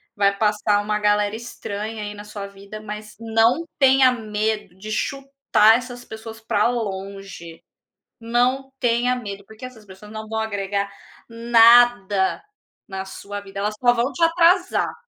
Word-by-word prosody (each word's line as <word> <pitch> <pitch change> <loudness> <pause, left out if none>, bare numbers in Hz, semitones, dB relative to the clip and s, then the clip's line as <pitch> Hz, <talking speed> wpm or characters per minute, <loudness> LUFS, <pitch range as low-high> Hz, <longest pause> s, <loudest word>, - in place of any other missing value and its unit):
vai 200 -1 +2
passar 210 -1 +1
uma 210 0 -1
galera 210 0 +1
estranha 220 -2 -6
aí 205 0 -5
na 205 0 -10
sua 205 -1 -7
vida, 200 +2 -11
mas 210 0 -9
não 230 +7 +2
tenha 265 -2 +5
medo 215 -3 -3
de 215 +3 -8
chutar 275 -5 +2
essas 245 0 -8
pessoas 220 0 -9
para 220 0 +1
longe. 195 -6 -6 0.6
Não 250 +4 0
tenha 245 +1 +1
medo, 200 -5 -7
porque 220 +3 -12
essas 225 -5 -11
pessoas 195 +3 -13
não 215 0 -7
vão 220 0 -2
agregar 200 -2 -2 0.4
nada 230 -4 +4 0.4
na 190 0 -6
sua 205 +1 -7
vida. 200 0 -8
Elas 210 +1 -2
só 245 -1 +4
vão 240 +3 0
te 340 - -5
atrasar. 345 +2 +3
215 Hz, 145 wpm, -22 LUFS, 205-240 Hz, 0.6 s, tenha